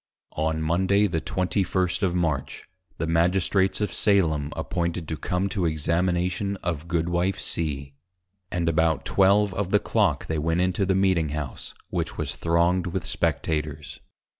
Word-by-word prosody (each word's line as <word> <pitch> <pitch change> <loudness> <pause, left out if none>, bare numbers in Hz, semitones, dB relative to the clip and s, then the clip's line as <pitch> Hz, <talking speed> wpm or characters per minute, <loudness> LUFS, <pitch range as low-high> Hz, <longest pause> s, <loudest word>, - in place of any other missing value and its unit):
On 80 0 0
Monday 95 +5 +2
the 85 -5 -1
21st. 90 +2 0
of 90 -3 +1
March, 80 -6 -2 0.3
the - - -1
Magistrates 90 +4 +2
of 105 - -1
Salem 80 -8 +2
appointed 85 -1 -2
to 80 - -3
come 90 +4 -1
to 95 -4 0
Examination 90 +5 0
of 85 -2 -3
Goodwife 85 +3 0
C. 70 -4 -3 0.6
And 85 -1 -1
about 80 -1 +2
Twelve 100 +1 +3
of 100 -1 -2
the 105 - +4
Clock 100 -8 +1
they 80 -1 -2
went 80 +3 0
into 90 +1 +1
the 95 - +2
Meeting 95 -5 +2
House, 75 -3 -5 0.2
which - - -2
was 75 -2 -3
thronged 85 +3 +1
with 90 0 -3
Spectators. 75 -2 -2
85 Hz, 145 wpm, -25 LUFS, 80-95 Hz, 0.6 s, the